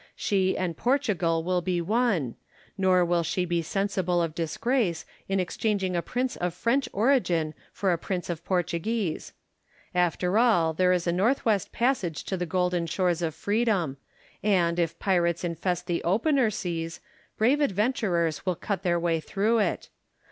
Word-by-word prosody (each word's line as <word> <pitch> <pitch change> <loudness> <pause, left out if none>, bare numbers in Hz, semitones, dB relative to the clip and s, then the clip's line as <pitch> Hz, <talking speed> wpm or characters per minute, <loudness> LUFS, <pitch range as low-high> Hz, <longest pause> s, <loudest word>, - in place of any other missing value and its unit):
She 190 -2 +1
and 175 -3 -2
Portugal 195 - +1
will 180 +1 0
be 175 0 -1
one: 190 - +1 0.4
nor 185 -2 +3
will 175 0 +2
she 180 +2 -1
be 170 -1 0
sensible 190 0 0
of 165 -2 -1
disgrace 170 - -1 0.2
in 195 0 +1
exchanging 190 0 -1
a 170 - +1
prince 250 +7 -2
of 175 -1 -3
French 245 +6 +1
origin 180 - +2 0.2
for 195 -2 0
a 170 - -2
prince 180 0 -3
of 170 -1 -4
Portuguese. 180 +1 -2 0.6
After 180 +3 +1
all 175 -10 +3
there 180 +3 +3
is 180 -2 +1
a 170 - +2
north 210 +10 +1
west 210 -5 +1
passage 215 - 0
to 190 - -3
the 180 -1 -3
golden 180 -1 0
shores 175 0 0
of 160 -2 -2
Freedom; 205 - 0 0.4
and, 175 -4 +2
if 165 -2 0
pirates 170 -3 +1
infest 175 +1 -2
the 170 -1 -2
opener 235 - +2
seas, 165 -4 -4 0.4
brave 260 +7 +3
adventurers 195 - 0
will 185 -1 0
cut 195 +2 -3
their 175 -2 +1
way 165 -1 +1
through 215 +7 +1
it. 210 - -1
180 Hz, 160 wpm, -27 LUFS, 170-210 Hz, 0.6 s, nor